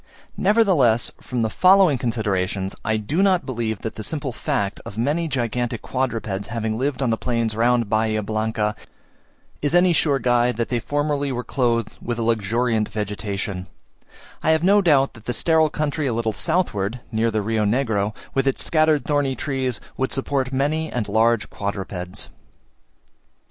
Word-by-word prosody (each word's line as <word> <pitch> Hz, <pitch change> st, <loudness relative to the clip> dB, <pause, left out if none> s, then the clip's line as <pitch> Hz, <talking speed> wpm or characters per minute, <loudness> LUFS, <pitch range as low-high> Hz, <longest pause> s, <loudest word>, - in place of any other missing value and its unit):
Nevertheless, 185 Hz, -, +3 dB
from 125 Hz, -2 st, -3 dB
the 110 Hz, -, +1 dB
following 185 Hz, -7 st, +5 dB
considerations, 100 Hz, -5 st, -1 dB
I 110 Hz, 0 st, +1 dB
do 140 Hz, -, -1 dB
not 190 Hz, -3 st, +3 dB
believe 115 Hz, -5 st, -3 dB
that 110 Hz, -, -5 dB
the -, -, -4 dB
simple 145 Hz, 0 st, -3 dB
fact 100 Hz, -2 st, -2 dB
of 100 Hz, -, -9 dB
many 150 Hz, +8 st, 0 dB
gigantic 120 Hz, -3 st, -2 dB
quadrupeds 115 Hz, -6 st, -2 dB
having 110 Hz, -1 st, -2 dB
lived 135 Hz, +2 st, -1 dB
on 120 Hz, -, +1 dB
the 115 Hz, -, -1 dB
plains 115 Hz, -3 st, -1 dB
round 120 Hz, 0 st, +2 dB
Bahia 110 Hz, 0 st, +1 dB
Blanca, 110 Hz, 0 st, -1 dB, 0.9 s
is 145 Hz, +4 st, +1 dB
any 175 Hz, 0 st, +5 dB
sure 145 Hz, -3 st, +2 dB
guide 120 Hz, -1 st, +2 dB
that 115 Hz, -, -1 dB
they 120 Hz, -, 0 dB
formerly 145 Hz, +3 st, -1 dB
were 125 Hz, -1 st, -3 dB
clothed 120 Hz, -1 st, -1 dB
with 120 Hz, -1 st, -3 dB
a 115 Hz, -, -1 dB
luxuriant 115 Hz, 0 st, +1 dB
vegetation: 100 Hz, -2 st, -4 dB, 0.7 s
I -, -, +1 dB
have 160 Hz, 0 st, +3 dB
no 200 Hz, +3 st, +5 dB
doubt 145 Hz, -7 st, +3 dB
that 110 Hz, -2 st, -15 dB
the 120 Hz, -, -2 dB
sterile 160 Hz, +5 st, +3 dB
country 150 Hz, -1 st, -1 dB
a 125 Hz, -, 0 dB
little 115 Hz, -1 st, -1 dB
southward, 125 Hz, -, -1 dB
near 115 Hz, +1 st, +1 dB
the 110 Hz, -2 st, -1 dB
Rio 110 Hz, +1 st, 0 dB
Negro, 110 Hz, -2 st, 0 dB, 0.2 s
with 135 Hz, 0 st, +1 dB
its 135 Hz, -, 0 dB
scattered 155 Hz, -2 st, +2 dB
thorny 145 Hz, -3 st, +1 dB
trees, 130 Hz, -5 st, -2 dB, 0.2 s
would 130 Hz, -, -1 dB
support 135 Hz, -1 st, -1 dB
many 150 Hz, +4 st, 0 dB
and 120 Hz, -4 st, -2 dB
large 110 Hz, +2 st, +2 dB
quadrupeds. 95 Hz, -3 st, -5 dB
120 Hz, 165 wpm, -22 LUFS, 110-145 Hz, 0.9 s, following